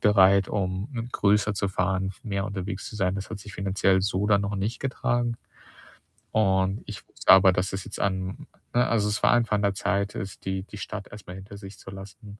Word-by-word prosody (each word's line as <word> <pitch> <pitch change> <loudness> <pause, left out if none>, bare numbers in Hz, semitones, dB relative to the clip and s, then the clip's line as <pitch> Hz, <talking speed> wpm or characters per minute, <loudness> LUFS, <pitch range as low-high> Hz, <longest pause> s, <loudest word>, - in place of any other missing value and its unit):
bereit, 100 -2 +5
um, 95 +1 -2
mm, 115 -1 -4
größer 105 +1 +3
zu 100 0 0
fahren, 95 0 0
f 95 - -10
mehr 100 -3 -1
unterwegs 95 -2 -4
zu - - -8
sein. 95 -2 +1
Das 100 - -5
hat - - -5
sich 105 +1 -10
finanziell 95 0 +2
so 100 0 0
dann 100 -1 +4
noch 100 0 -2
nicht 105 +5 -2
getragen. 120 -3 0 1.0
Und 95 -1 +2
ich - - -8
wusste - - +2
aber, 95 0 +7
dass 90 +1 -1
das 95 -1 -4
jetzt 100 - -7
an 95 -1 -2 0.3
ne, 120 0 +3
also, 105 -3 +2
es 105 - -1
war - - +6
einfach 120 -3 +2
an 105 - 0
der 100 -1 +2
Zeit, 100 +1 -1
es 95 0 -5
die 95 0 -3
die 105 - -11
Stadt 100 0 -6
erst 105 -1 -11
mal 90 - -7
hinter 100 +2 -10
sich 100 -1 -10
zu - - -11
lassen. 100 +2 -11
100 Hz, 225 wpm, -26 LUFS, 95-105 Hz, 1.0 s, aber